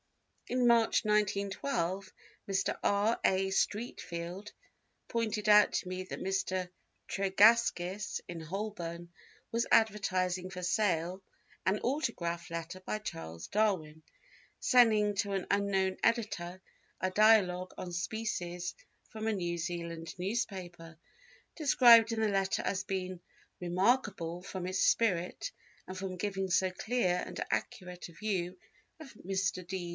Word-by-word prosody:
In 250 Hz, -1 st, +2 dB
March, 230 Hz, -2 st, +4 dB
1912, 200 Hz, -2 st, 0 dB, 0.4 s
Mr. 195 Hz, 0 st, 0 dB
R. 205 Hz, +3 st, +2 dB
A. 190 Hz, 0 st, +2 dB
Streatfeild 190 Hz, -3 st, -3 dB, 0.6 s
pointed 220 Hz, -2 st, -1 dB
out 210 Hz, -1 st, +7 dB
to -, -, -1 dB
me 185 Hz, 0 st, -4 dB
that 185 Hz, -, -7 dB
Mr. 185 Hz, -1 st, -1 dB, 0.4 s
Tregaskis, 195 Hz, -1 st, +3 dB
in 170 Hz, -1 st, -6 dB
Holborn, 175 Hz, -1 st, -5 dB, 0.4 s
was 230 Hz, +1 st, 0 dB
advertising 185 Hz, -4 st, +2 dB
for 180 Hz, -1 st, -7 dB
sale 180 Hz, -2 st, 0 dB, 0.4 s
an 195 Hz, +2 st, +2 dB
autograph 180 Hz, -, -2 dB
letter 170 Hz, +2 st, -5 dB
by 200 Hz, -, -3 dB
Charles 80 Hz, -, -7 dB
Darwin 180 Hz, -8 st, 0 dB, 0.6 s
sending 215 Hz, -4 st, +4 dB
to 200 Hz, 0 st, 0 dB
an 195 Hz, -2 st, -1 dB
unknown 195 Hz, -2 st, +1 dB
editor 190 Hz, -6 st, 0 dB, 0.4 s
a 185 Hz, -, -1 dB
Dialogue 185 Hz, -3 st, +4 dB
on 175 Hz, -1 st, -6 dB
Species 175 Hz, -2 st, -3 dB, 0.3 s
from 220 Hz, -1 st, -5 dB
a 220 Hz, -, +2 dB
New 175 Hz, -3 st, -2 dB
Zealand 170 Hz, -1 st, -4 dB
newspaper, 180 Hz, -5 st, -4 dB, 0.6 s
described 240 Hz, -7 st, +7 dB
in 225 Hz, -, -1 dB
the 220 Hz, -, +2 dB
letter 195 Hz, -1 st, 0 dB
as 190 Hz, 0 st, -1 dB
being 185 Hz, -2 st, -4 dB, 0.4 s
"remarkable 180 Hz, -2 st, +1 dB
from 185 Hz, -1 st, -6 dB
its 185 Hz, 0 st, -2 dB
spirit 190 Hz, -, +1 dB, 0.4 s
and 185 Hz, -, -7 dB
from 185 Hz, -1 st, -4 dB
giving 195 Hz, 0 st, -2 dB
so 185 Hz, +1 st, +2 dB
clear 185 Hz, -3 st, 0 dB
and -, -, -7 dB
accurate 180 Hz, -1 st, -4 dB
a -, -, -15 dB
view 185 Hz, -2 st, -2 dB, 0.4 s
of 300 Hz, -4 st, -11 dB
Mr. 190 Hz, -2 st, -2 dB
D. 180 Hz, -1 st, -4 dB
190 Hz, 125 wpm, -32 LUFS, 180-210 Hz, 0.6 s, out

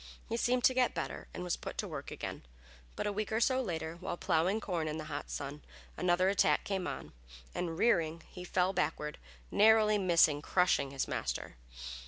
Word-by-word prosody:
He 230 Hz, -, -1 dB
seemed 245 Hz, +1 st, +1 dB
to 260 Hz, -, +6 dB
get 255 Hz, -1 st, +2 dB
better -, -, -4 dB
and 180 Hz, -, -6 dB
was 180 Hz, -1 st, 0 dB
put -, -, -7 dB
to -, -, -2 dB
work -, -, -6 dB
again, -, -, -6 dB, 0.5 s
but -, -, -3 dB
a 205 Hz, -, 0 dB
week 210 Hz, +1 st, -3 dB
or 220 Hz, -, +1 dB
so 260 Hz, +2 st, +3 dB
later, 165 Hz, -6 st, -4 dB
while 175 Hz, -1 st, -4 dB
plowing 180 Hz, +5 st, +1 dB
corn 175 Hz, -6 st, -2 dB
in 155 Hz, 0 st, -3 dB
the 155 Hz, -, -4 dB
hot 145 Hz, -1 st, -5 dB
sun, 145 Hz, +1 st, -5 dB, 0.3 s
another 180 Hz, +1 st, +2 dB
attack 200 Hz, +1 st, +3 dB
came 190 Hz, -2 st, -2 dB
on, -, -, -6 dB, 0.4 s
and 165 Hz, -2 st, -3 dB
rearing, 170 Hz, -7 st, +2 dB
he 180 Hz, -, -8 dB
fell 180 Hz, +1 st, +1 dB
backward, 150 Hz, -4 st, -1 dB, 0.3 s
narrowly 215 Hz, -1 st, +5 dB
missing 170 Hz, -5 st, +4 dB
crushing 170 Hz, -5 st, +2 dB
his 135 Hz, -1 st, -2 dB
master. -, -, -3 dB
180 Hz, 190 wpm, -33 LUFS, 160-210 Hz, 0.5 s, to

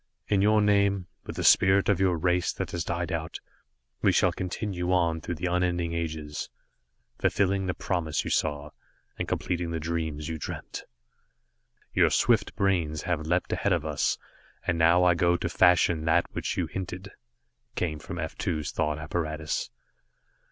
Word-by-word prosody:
"In 100 Hz, -2 st, +3 dB
your 105 Hz, +1 st, +4 dB
name, 100 Hz, -2 st, +2 dB, 0.2 s
with -, -, -6 dB
the -, -, -3 dB
spirit 95 Hz, +1 st, +5 dB
of 100 Hz, -4 st, +2 dB
your 95 Hz, -3 st, +2 dB
race 90 Hz, +1 st, +1 dB
that -, -, -4 dB
has 85 Hz, -2 st, -2 dB
died 85 Hz, +2 st, -2 dB
out, 80 Hz, -1 st, -4 dB, 0.6 s
we -, -, +4 dB
shall -, -, +3 dB
continue 90 Hz, -1 st, -3 dB
on 85 Hz, -3 st, +2 dB
through 85 Hz, -, -4 dB
the 85 Hz, +4 st, -4 dB
unending 90 Hz, -1 st, 0 dB
ages, 80 Hz, -3 st, -4 dB, 0.7 s
fulfilling 95 Hz, -1 st, +1 dB
the 90 Hz, -, -1 dB
promise 80 Hz, -5 st, -1 dB
you -, -, -4 dB
saw, 75 Hz, -1 st, -1 dB, 0.5 s
and -, -, -2 dB
completing 85 Hz, -1 st, -2 dB
the 85 Hz, -1 st, -2 dB
dreams 80 Hz, -2 st, -3 dB
you 80 Hz, -1 st, -4 dB
dreamt. -, -, -6 dB, 1.1 s
"Your -, -, +4 dB
swift 115 Hz, -4 st, +2 dB
brains 85 Hz, -6 st, 0 dB
have 85 Hz, -4 st, -2 dB
leapt 90 Hz, +2 st, 0 dB
ahead -, -, +1 dB
of -, -, -1 dB
us, -, -, 0 dB, 0.5 s
and 85 Hz, -, 0 dB
now 85 Hz, +2 st, +5 dB
I 90 Hz, -1 st, +5 dB
go 85 Hz, +1 st, +2 dB
to 85 Hz, -, -2 dB
fashion 85 Hz, -2 st, +3 dB
that 80 Hz, -, +3 dB
which -, -, -3 dB
you -, -, +1 dB
hinted," 95 Hz, +1 st, -6 dB, 0.6 s
came 80 Hz, -4 st, -2 dB
from 85 Hz, -, -7 dB
F 80 Hz, -2 st, -4 dB
2's 75 Hz, -6 st, -2 dB
thought 75 Hz, -1 st, -1 dB
apparatus. 80 Hz, -1 st, -3 dB
85 Hz, 165 wpm, -27 LUFS, 80-90 Hz, 1.1 s, spirit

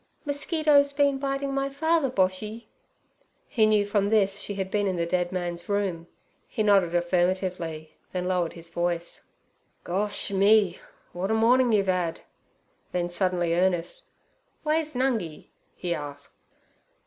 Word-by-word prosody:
'Mosquitoes 285 Hz, -1 st, +2 dB
been 280 Hz, -1 st, +2 dB
biting 275 Hz, 0 st, -2 dB
my 275 Hz, 0 st, 0 dB
father, 320 Hz, +1 st, +1 dB
Boshy?' 210 Hz, +2 st, -1 dB, 0.8 s
He 220 Hz, -3 st, +3 dB
knew 210 Hz, -1 st, +3 dB
from 205 Hz, 0 st, +1 dB
this 200 Hz, -2 st, +2 dB
she 205 Hz, 0 st, -2 dB
had 190 Hz, -1 st, -3 dB
been 205 Hz, -1 st, +1 dB
in 190 Hz, -, 0 dB
the 170 Hz, -1 st, 0 dB
dead 175 Hz, 0 st, 0 dB
man's 175 Hz, -1 st, -4 dB
room. 190 Hz, -5 st, -1 dB, 0.4 s
He 215 Hz, -, -2 dB
nodded 195 Hz, -5 st, +3 dB
affirmatively, 175 Hz, -2 st, -1 dB, 0.2 s
then 180 Hz, -1 st, -2 dB
lowered 180 Hz, -2 st, 0 dB
his 170 Hz, 0 st, -7 dB
voice: 170 Hz, 0 st, -3 dB, 0.6 s
'Gosh 205 Hz, +3 st, -1 dB
me! 200 Hz, -1 st, +4 dB, 0.3 s
w'at 185 Hz, +3 st, -3 dB
a 220 Hz, -, +2 dB
mornin' 240 Hz, +2 st, +4 dB
you've 200 Hz, -3 st, +2 dB
'ad!' 180 Hz, -3 st, 0 dB, 0.7 s
Then, 175 Hz, -1 st, -1 dB
suddenly 175 Hz, -2 st, 0 dB
earnest, 175 Hz, -1 st, 0 dB, 0.6 s
'Way's 310 Hz, -1 st, 0 dB
Nungi?' 230 Hz, -, -1 dB, 0.3 s
he 175 Hz, -1 st, -2 dB
asked. 145 Hz, -2 st, -7 dB
195 Hz, 135 wpm, -26 LUFS, 175-230 Hz, 0.8 s, me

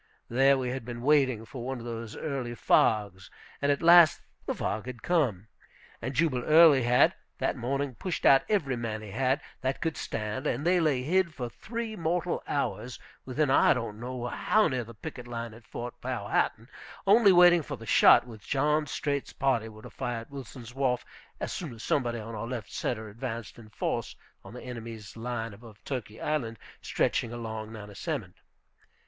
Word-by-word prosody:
There 135 Hz, +3 st, +4 dB
we 130 Hz, -1 st, -2 dB
had 130 Hz, 0 st, -4 dB
been 120 Hz, 0 st, -7 dB
waiting 130 Hz, -6 st, +3 dB
for 120 Hz, +1 st, -8 dB
one 130 Hz, +1 st, -3 dB
of 120 Hz, -, -9 dB
those 115 Hz, -2 st, -6 dB
early 130 Hz, -5 st, -4 dB
fogs, 100 Hz, -4 st, +2 dB, 0.3 s
and 145 Hz, 0 st, +3 dB
at 140 Hz, -, -1 dB
last 170 Hz, -2 st, +8 dB, 0.3 s
the -, -, -1 dB
fog 110 Hz, +3 st, -3 dB
had 125 Hz, -3 st, -7 dB
come. 125 Hz, -, +1 dB, 0.5 s
And 130 Hz, +3 st, -4 dB
Jubal 135 Hz, -6 st, +1 dB
Early 155 Hz, -3 st, +7 dB
had, 125 Hz, +1 st, +4 dB, 0.2 s
that -, -, 0 dB
morning, 135 Hz, +3 st, -2 dB
pushed 180 Hz, +8 st, -4 dB
out 135 Hz, -1 st, +7 dB
every 155 Hz, -12 st, +1 dB
man 110 Hz, -2 st, -4 dB
he 105 Hz, -, -8 dB
had, 130 Hz, +6 st, +1 dB, 0.2 s
that 130 Hz, +1 st, -1 dB
could 165 Hz, -3 st, -1 dB
stand; 110 Hz, +2 st, -3 dB
and 135 Hz, +6 st, -1 dB
they 180 Hz, +1 st, +4 dB
lay 145 Hz, -6 st, +1 dB
hid 170 Hz, +2 st, +1 dB
for 125 Hz, -3 st, -4 dB
three 230 Hz, -, -5 dB
mortal 175 Hz, -1 st, -1 dB
hours, 120 Hz, -4 st, -2 dB, 0.3 s
within 135 Hz, +2 st, 0 dB
I -, -, +5 dB
don't 115 Hz, -4 st, -4 dB
know 125 Hz, 0 st, -5 dB
how 215 Hz, -, +2 dB
near 130 Hz, -3 st, -1 dB
the 115 Hz, 0 st, -12 dB
picket 125 Hz, -1 st, -8 dB
line 115 Hz, -1 st, -5 dB
at 115 Hz, +2 st, -15 dB
Fort 120 Hz, 0 st, -7 dB
Powhatan, 115 Hz, -2 st, -1 dB, 0.4 s
only 205 Hz, +1 st, +6 dB
waiting 175 Hz, -1 st, +7 dB
for -, -, -6 dB
the -, -, -11 dB
shot -, -, +6 dB
which 110 Hz, -4 st, -12 dB
John 150 Hz, +2 st, +2 dB
Streight's 140 Hz, -1 st, -2 dB
party 125 Hz, -5 st, 0 dB
were 110 Hz, 0 st, -13 dB
to -, -, -10 dB
fire 120 Hz, -2 st, -3 dB
at 115 Hz, -, -14 dB
Wilson's 125 Hz, -3 st, -9 dB
Wharf, 130 Hz, -2 st, 0 dB, 0.3 s
as -, -, -3 dB
soon 155 Hz, -9 st, -5 dB
as 110 Hz, -, -10 dB
somebody 120 Hz, -4 st, 0 dB
on 115 Hz, +1 st, -7 dB
our 110 Hz, +1 st, -4 dB
left 120 Hz, -5 st, -5 dB
centre 110 Hz, -3 st, -2 dB
advanced 115 Hz, +1 st, -6 dB
in 110 Hz, -2 st, -13 dB
force 105 Hz, -, -3 dB, 0.3 s
on 95 Hz, +5 st, -11 dB
the 125 Hz, -, -8 dB
enemy's 115 Hz, -4 st, -8 dB
line 115 Hz, -1 st, -4 dB
above 110 Hz, 0 st, -13 dB
Turkey 115 Hz, -5 st, -5 dB
Island 125 Hz, -7 st, -2 dB, 0.2 s
stretching 115 Hz, -, 0 dB
across 110 Hz, -2 st, -5 dB
to -, -, -12 dB
Nansemond. 105 Hz, -, -5 dB
125 Hz, 185 wpm, -29 LUFS, 115-145 Hz, 0.5 s, last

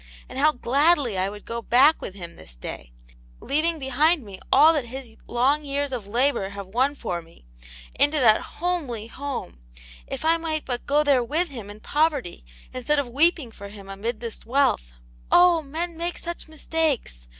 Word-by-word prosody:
And 260 Hz, -, -6 dB
how 305 Hz, +2 st, +5 dB
gladly 275 Hz, -, +2 dB
I 190 Hz, +1 st, 0 dB
would 205 Hz, 0 st, -10 dB
go 235 Hz, 0 st, -4 dB
back 270 Hz, +7 st, +4 dB
with 190 Hz, -, -7 dB
him 170 Hz, -3 st, -9 dB
this -, -, -13 dB
day, -, -, -8 dB, 0.5 s
leaving 320 Hz, +3 st, 0 dB
behind 295 Hz, +3 st, +2 dB
me 195 Hz, -3 st, -10 dB
all 305 Hz, +4 st, +7 dB
that 290 Hz, -6 st, -1 dB
his 250 Hz, -2 st, -8 dB
long 270 Hz, +5 st, +2 dB
years 285 Hz, 0 st, -2 dB
of 235 Hz, -6 st, -5 dB
labour 235 Hz, -2 st, +1 dB
have 200 Hz, 0 st, -7 dB
won 255 Hz, +9 st, 0 dB
for 180 Hz, -10 st, -4 dB
me, 165 Hz, -, -20 dB, 0.5 s
into 300 Hz, +2 st, +4 dB
that 220 Hz, -4 st, +5 dB
homely 305 Hz, -11 st, -3 dB
home, 260 Hz, -, -6 dB, 0.5 s
if -, -, -5 dB
I 330 Hz, +1 st, +4 dB
might 315 Hz, -2 st, -2 dB
but 245 Hz, -2 st, -4 dB
go 295 Hz, +1 st, +3 dB
there 275 Hz, -4 st, +3 dB
with 320 Hz, +8 st, -1 dB
him 230 Hz, -7 st, -8 dB
in 210 Hz, +1 st, -11 dB
poverty 290 Hz, -, 0 dB, 0.3 s
instead 255 Hz, +4 st, 0 dB
of 280 Hz, -4 st, 0 dB
weeping 295 Hz, -1 st, +2 dB
for 200 Hz, -2 st, -10 dB
him 200 Hz, -1 st, -12 dB
amid 215 Hz, +4 st, -4 dB
this 230 Hz, -2 st, -6 dB
wealth! 235 Hz, -, +1 dB, 0.4 s
Oh! 350 Hz, -2 st, +6 dB
men 325 Hz, +4 st, -5 dB
make 345 Hz, +1 st, -2 dB
such 345 Hz, -1 st, -6 dB
mistakes! 305 Hz, -, -2 dB
265 Hz, 180 wpm, -24 LUFS, 215-305 Hz, 0.5 s, all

